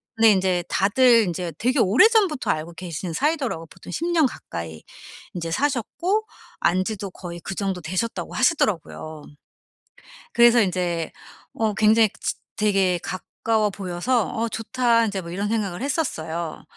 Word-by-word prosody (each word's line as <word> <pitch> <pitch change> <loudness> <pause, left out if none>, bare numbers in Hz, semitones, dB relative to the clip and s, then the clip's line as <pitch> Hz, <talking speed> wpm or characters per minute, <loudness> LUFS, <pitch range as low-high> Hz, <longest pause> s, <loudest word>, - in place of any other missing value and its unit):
근데 225 -1 +6
인제 185 -2 +1
다들 230 +4 +4
인제 175 -1 -3
되게 255 +4 +1
오래전부터 325 - +4
알고 160 +2 -4
계신 170 0 -5
사이더라고요. 270 - -1
보통 180 - -12
10 330 - -2
년 320 -4 +4
가까이 80 - -8 0.5
인제 165 -1 -4
사셨고 295 - 0 0.3
안 185 +2 +2
지도 205 -3 -4
거의 175 -2 -8
그 190 - -5
정도 195 -3 -2
되셨다고 185 +8 -3
하시더라고요. 165 - 0 1.1
그래서 235 0 +6
인제 175 -3 -1 0.4
어 220 -2 0
굉장히 215 0 +4
지 - - -1 0.2
되게 195 -4 +2
가까워 215 +3 -1
보여서 195 +5 -1
'어 230 +1 -1
좋다.' 230 0 +1
인제 195 -3 -3
뭐 170 - -8
이런 200 +3 -2
생각을 205 -5 -2
했었어요. 170 - -3
200 Hz, 310 characters per minute, -23 LUFS, 175-235 Hz, 1.1 s, 근데